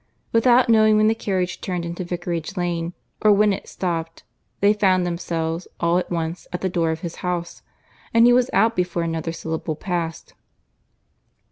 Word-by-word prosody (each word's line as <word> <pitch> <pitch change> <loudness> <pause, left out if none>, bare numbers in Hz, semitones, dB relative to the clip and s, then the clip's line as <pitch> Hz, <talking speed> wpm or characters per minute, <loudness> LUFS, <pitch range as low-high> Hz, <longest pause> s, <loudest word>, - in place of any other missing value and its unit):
Without 240 +2 +4
knowing 215 -2 +5
when 215 0 +4
the - - +3
carriage 185 -4 -2
turned 180 -2 -3
into 170 +2 -4
Vicarage 175 +1 -4
Lane, 175 -1 -2 0.3
or 215 - +5
when 205 0 +4
it - - -6
stopped, 165 -3 -3 0.4
they 205 +1 +5
found 190 -3 +2
themselves, 170 -1 -3
all 170 +1 +2
at - - -5
once, 165 0 -3
at 180 - -4
the 190 - 0
door 170 -2 0
of 160 0 -3
his 170 -2 -6
house; 175 -1 -4 0.5
and 230 0 +5
he 245 - +6
was 250 0 +3
out 225 +1 +3
before 175 -1 -1
another 165 0 -2
syllable 160 -1 -4
passed. 170 -2 -4
180 Hz, 170 wpm, -22 LUFS, 170-205 Hz, 0.5 s, he